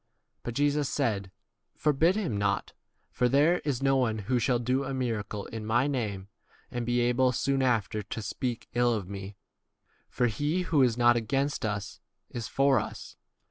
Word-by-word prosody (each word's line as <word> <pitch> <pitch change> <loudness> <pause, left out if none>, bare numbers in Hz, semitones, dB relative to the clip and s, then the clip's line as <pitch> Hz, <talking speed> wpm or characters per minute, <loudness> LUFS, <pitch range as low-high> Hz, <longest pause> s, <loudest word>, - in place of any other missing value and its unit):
But 120 - -5
Jesus 145 0 +1
said, 105 -9 -1 0.5
For 150 - +2
bid 165 +7 +3
him 190 - -1
not; 100 -1 -1 0.4
for 125 - +1
there 150 +7 +4
is 135 -3 -2
no 135 0 +4
one 115 -4 +1
who 115 +4 0
shall 125 +1 +2
do 125 +3 0
a 135 0 -3
miracle 110 -5 -3
in 110 -1 -6
my 120 +4 +2
name, 105 -9 -2 0.4
and 120 -1 -3
be 120 0 +2
able 125 +1 +3
soon 135 +2 0
[after] 115 -4 +1
to 105 +2 -6
speak 120 +2 -3
40 120 - -1
ill 120 -1 +4
of 100 -4 -4
me; 100 +1 -7 0.7
for 125 - 0
he 145 +10 0
who 155 -5 +2
is 120 -3 +3
not 120 0 +5
against 135 +5 -1
41 105 -2 0
us 100 -2 -9 0.3
is 115 -1 -4
for 135 -2 +3
us. 105 - -7
120 Hz, 185 wpm, -28 LUFS, 110-135 Hz, 0.7 s, not